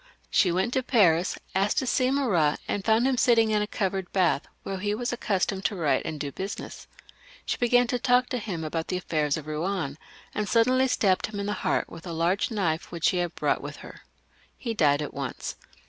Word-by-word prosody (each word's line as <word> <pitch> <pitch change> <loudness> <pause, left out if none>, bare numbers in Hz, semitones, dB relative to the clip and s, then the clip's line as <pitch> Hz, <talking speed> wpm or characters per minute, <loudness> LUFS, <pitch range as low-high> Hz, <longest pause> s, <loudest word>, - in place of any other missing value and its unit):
She 180 - +4
went 190 +8 0
to 260 - +2
Paris, 185 -9 +3 0.2
asked 195 +2 +1
to - - +2
see 255 0 +2
Marat, 200 - +2
and 200 - -2
Jound 225 +3 +3
him 265 -1 +2
sitting 230 -3 +4
in 210 -1 +2
a 210 - -1
covered 190 -3 -2
bath, 180 -6 +2 0.2
where 195 -1 -4
he 205 +2 -1
was 240 +2 -2
accustomed 195 -3 -1
to 210 - +1
write 160 -6 +1
and 155 - -4
do 145 -1 -3
business. 195 +7 -6 0.6
She - - -1
began 245 0 +4
to 245 +1 -1
talk 245 +1 +3
to 250 - -1
him 185 -7 -4
about 160 +1 -3
the 180 - -1
affairs 155 -5 0
of 155 - -7
Eouen, 155 -1 -2 0.4
and 210 -2 -2
suddenly 255 +3 +4
stabbed 195 -7 +2
him 210 -2 -6
in 200 - -2
the 205 - -1
heart 185 - 0
with 165 - -11
a 170 - -4
large 175 - +1
knife 175 -8 -1
which 170 -2 +1
.she 185 - 0
had 175 -1 -2
brought - - 0
with - - -7
her. - - -12 0.6
He 230 -3 -3
died 150 -7 +3
at - - -6
once. 140 -2 -5
195 Hz, 215 wpm, -27 LUFS, 165-230 Hz, 0.6 s, She